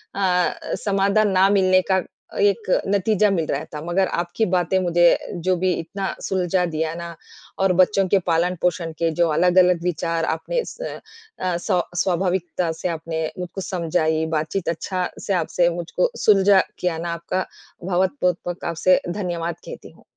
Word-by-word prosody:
अ, 180 -2 +2 0.3
समाधान 200 +1 +2
ना 190 +1 +4
मिलने 185 -2 +4
का 190 - +3 0.4
एक 200 0 +2 0.2
नतीजा 205 +1 +2
मिल 170 -5 0
रहा - - -2
था, 150 - -5
मगर 185 +2 +1
आपकी 175 +6 -1
बातें 180 0 +2
मुझे 175 -1 +3 0.4
जो 185 -1 +3
भी 185 - +3
इतना 190 +4 -4
सुलझा 185 -1 0
दिया 160 -1 -2
ना, 170 0 -7 0.4
और 190 -1 +3
बच्चों 195 0 +2
के 195 +1 +3
पालन-पोषण 170 0 0
के 165 -1 +2
जो 170 - +4
अलग-अलग 180 +2 +4
विचार 165 -1 -1
आपने 485 - -2
इस - - -9
अ, 440 - -6
स्व 180 -1 0 0.2
स्वाभाविकता 180 -2 -1
से 180 - -1
आपने 160 -1 -3 0.2
मुझको 180 +2 -5
समझाई 160 -3 0
बात-चीत 160 +5 -2
अच्छा 180 +2 -2 0.2
से 200 - +1
आपसे 175 -1 +1
मुझको 175 - -1 0.2
सुलझा 195 -2 +6 0.2
किया 180 -3 -1
ना 170 +1 -3
आपका 170 +3 -3 0.5
भवत 185 +8 +1
बहुत-बहुत 175 0 -1
आपसे 185 +3 +3
धन्यवाद 175 -3 -3
कहती - - -10
हूँ। - - -22
180 Hz, 155 wpm, -22 LUFS, 170-195 Hz, 0.5 s, सुलझा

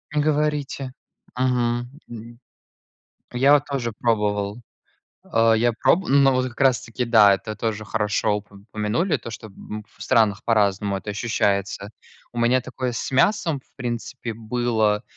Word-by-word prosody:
Не 150 - +3
говорите. 145 -3 -1 0.4
Мгм, 120 -1 0 0.2
д 115 0 -10 1.0
Я 135 +4 +5
вот 145 -1 +3
тоже 130 -5 -3
пробовал, 105 -2 0 0.6
а, 115 0 +3
я 120 +2 +2
проб 165 +10 +2
но 135 0 +5
вот 130 0 0
как 120 - -15
раз 130 -4 +4
таки, 115 +2 -4
да, 110 -4 +6
это 110 +2 -6
тоже 110 -2 -3
хорошо 105 0 0
уп 105 0 -9
упомянули, 105 - -1
то, - - -9
что, 110 - -9
м, 105 +2 -9
в - - -26
странах 110 -5 +2
по-разному 100 -3 +1
это 100 +2 -6
ощущается. 100 -2 -1 0.4
У 120 - -6
меня 120 +2 +3
такое 130 0 -4
с - - -4
мясом, 160 +2 +2
в - - -38
принципе, 120 -1 -5
было. 110 -2 0
115 Hz, 150 wpm, -23 LUFS, 105-130 Hz, 1.0 s, да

